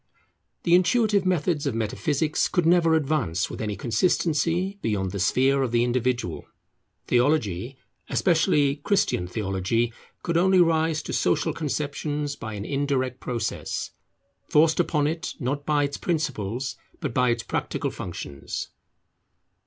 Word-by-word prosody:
The 170 - +2
intuitive 200 +2 +3
methods 165 -4 +1
of 130 - -1
metaphysics 145 +7 0
could 175 -3 0
never 165 -1 +4
advance 145 - 0
with - - -6
any 105 -2 -2
consistency 170 - 0
beyond 95 -4 -1
the 100 - -4
sphere 130 +8 +3
of 130 -3 0
the 120 0 +3
individual. 125 -6 -1 0.6
Theology, 125 - +1 0.3
especially 155 -5 +2
Christian 150 - +1
theology, 105 +4 -1 0.3
could 170 -1 0
only 190 +2 +4
rise 160 -2 +2
to - - -5
social 160 - +1
conceptions 145 -1 -2
by 110 -4 -6
an 100 0 -5
indirect 135 -2 -1
process, 115 -4 -3 0.6
forced 155 +2 +4
upon 150 -4 +2
it, 160 +3 -2
not 145 +2 -3
by 150 -1 +3
its 140 0 -2
principles, 135 - -2 0.2
but 145 -7 -3
by 125 0 +3
its 120 -1 0
practical - - -2
functions. 70 -1 -6
145 Hz, 130 wpm, -25 LUFS, 120-165 Hz, 0.6 s, never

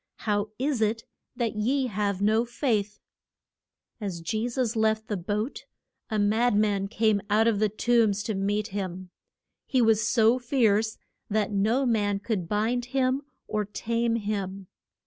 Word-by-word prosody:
How 205 -1 0
is 265 -2 -1
it 220 +1 +1 0.3
that 235 -3 -1
ye 260 +6 +1
have 200 -3 -1
no 220 +2 +3
faith? 230 -4 -1 1.0
As 195 -6 -4
Je 220 +7 -2
sus 240 -2 -1
left 220 0 +1
the 210 - 0
boat 205 +7 -3 0.4
a 215 - -1
mad 215 +3 +2
man 205 -2 +1
came 215 -1 +1
out 215 +2 +4
of 220 -3 +2
the 215 0 +2
tombs 215 -1 +2
to 220 - -2
meet 205 +2 -1
him. 185 -2 -5 0.6
He 260 - +1
was 225 -2 +4
so 225 +3 +3
fierce 225 -4 +1 0.3
that 215 0 0
no 220 +7 +2
man 205 -4 +1
could 200 -4 -3
bind 225 +4 0
him, 260 +1 0 0.3
or 215 -1 -1
tame 230 +3 -1
him. 200 -3 -3
215 Hz, 150 wpm, -27 LUFS, 205-235 Hz, 1.0 s, out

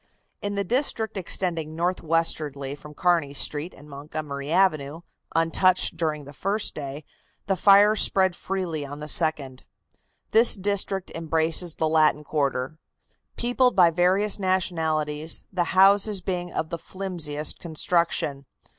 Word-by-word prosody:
In 205 0 -3
the 200 - -1
district 230 0 0
extending 165 -4 -3
northwestwardly 160 -5 -1
from 150 +1 -13
Kearney 170 -5 +1
Street 150 +5 0
and 145 - -15
Montgomery 145 0 -6
Avenue, 160 -4 +1 0.3
untouched 170 +3 +2
during 155 -3 -3
the 145 - -12
first 200 +8 -2
day, 145 0 -7 0.4
the 195 - 0
fire 200 +3 +5
spread 190 -3 +3
freely 180 -6 -4
on 145 +1 -8
the 150 - -7
second. 150 -5 +1 0.7
This 230 +2 +6
district 195 -1 -1
embraces 165 +1 0
the 160 - 0
Latin 155 -1 +2
quarter, 140 0 -2 0.6
peopled 245 +1 +1
by 175 -3 +5
various 185 +5 +2
nationalities, 160 -5 -1
the 175 -2 0
houses 200 +1 +5
being 180 -1 -4
of 160 - -4
the 170 - -4
flimsiest 165 -5 -4
construction. 160 -4 -1
165 Hz, 130 wpm, -24 LUFS, 150-190 Hz, 0.7 s, This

